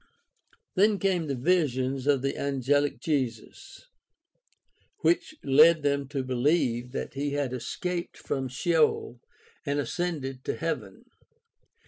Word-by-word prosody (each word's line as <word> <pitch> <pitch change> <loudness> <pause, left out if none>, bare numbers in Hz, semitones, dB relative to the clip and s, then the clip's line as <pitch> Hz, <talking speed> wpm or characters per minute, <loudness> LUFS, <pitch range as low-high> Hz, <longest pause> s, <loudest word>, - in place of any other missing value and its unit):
Then 205 +2 +4
came 185 -5 0
the 140 - -1
visions 135 -3 0
of 140 -3 +3
the 135 - 0
angehc 140 +1 0
Jesus, 130 - -3 1.2
which 340 -2 +1
led 155 +3 +6
them 140 -1 0
to 135 -1 -3
beheve 125 -2 +1
that - - -5
he 140 +1 -2
had 140 -3 -1
escaped 175 +7 -4
from 135 -1 -3
Sheol 150 -2 +1 0.4
and 145 -2 -1
ascended 140 -3 -3
to - - -1
heaven. 115 -12 -4
140 Hz, 115 wpm, -27 LUFS, 130-165 Hz, 1.2 s, led